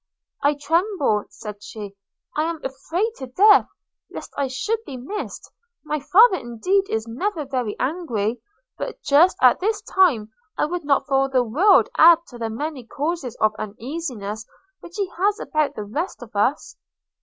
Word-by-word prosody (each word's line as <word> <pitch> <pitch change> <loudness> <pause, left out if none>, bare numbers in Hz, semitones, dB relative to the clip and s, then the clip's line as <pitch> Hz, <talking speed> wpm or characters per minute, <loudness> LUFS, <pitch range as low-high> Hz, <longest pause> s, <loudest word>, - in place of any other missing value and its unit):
'I 290 +1 +3
tremble,' 300 - 0
said 210 -2 -9
she, 205 -1 -8 0.4
'and 305 +2 +1
am 330 -2 -4
terrified 325 - -2
to 260 - -7
death, 405 +12 +5 0.4
lest - - -9
I 280 - 0
should 275 - -2
be 275 - -8
missed: 390 +13 -6 0.3
my 300 0 -2
father 380 - +5
indeed 365 - 0
is 220 +1 -2
never 305 - -3
very 250 -6 -2
angry; 245 - -2 0.4
but - - -5
just 310 +6 +4
at 255 - +6
this 425 +3 0
time 260 - +2 0.3
I - - +2
would 345 0 -4
not 280 -1 +2
for 270 -1 +2
the 255 -2 +2
world 320 - +4
add 335 +1 +9
to 240 - -11
the 225 -1 -2
many 285 +3 -4
causes 285 +1 -3
of 215 0 +2
uneasiness 220 -2 -5 0.4
which 345 0 -13
he 400 -2 0
has 410 +3 +2
about 305 -2 -1
the 210 - -4
rest 295 - -4
of 215 - -15
us.' 230 +8 0
285 Hz, 165 wpm, -22 LUFS, 235-350 Hz, 0.4 s, add